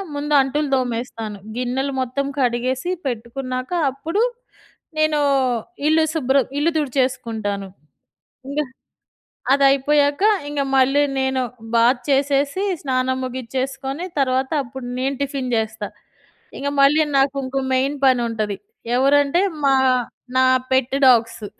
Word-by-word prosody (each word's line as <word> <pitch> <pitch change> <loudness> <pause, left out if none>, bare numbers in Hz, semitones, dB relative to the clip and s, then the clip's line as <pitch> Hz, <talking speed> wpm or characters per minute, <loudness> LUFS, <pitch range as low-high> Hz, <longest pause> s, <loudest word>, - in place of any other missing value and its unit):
ముందు 295 +1 -2
అంటులు 290 +2 -1
తోమేస్తాను. 230 -4 -3 0.2
గిన్నెలు 255 +3 -1
మొత్తం 260 +2 -2
కడిగేసి 255 +5 0 0.2
పెట్టుకున్నాక, 255 +2 -4 0.2
అప్పుడు 320 +10 -2 0.8
నేను 310 -1 +2 0.7
ఇల్లు 320 +1 +4
శుభ్రం 270 -4 +2
ఇల్లు 320 +3 +2
తుడిచేసుకుంటాను. 230 -7 -2 0.8
ఇంగ 285 +2 -1 0.9
అది 275 0 +4
అయిపోయాక 285 +4 +2 0.2
ఇంగా, 290 -1 -1
మళ్ళీ 270 +2 +4 0.2
నేను 265 0 0 0.3
బాత్ 240 +2 +4
చేసేసి, 280 +5 +1 0.2
స్నానం 260 -1 0
ముగిచ్చేసుకొని 265 +4 -4 0.2
తర్వాత 260 0 +1
అప్పుడు 245 +1 -8
నేను 270 +2 -1
టిఫిన్ 270 -3 -3
జేస్తా. 220 -1 -2 0.7
ఇంగ 280 - -2
మళ్ళీ 295 +3 +5 0.2
నాకు 270 +1 +2
ఇంకో 265 +1 -2
మెయిన్ 270 +3 +1
పని 255 -2 +4
ఉంటది. 215 -3 -2 0.4
ఎవరంటే 285 +5 +3 0.2
మా 275 -1 +4 0.6
నా 260 - +5 0.3
పెట్ 260 0 +1
డాగ్సు. 230 -3 +3
265 Hz, 110 wpm, -21 LUFS, 250-280 Hz, 0.9 s, మళ్ళీ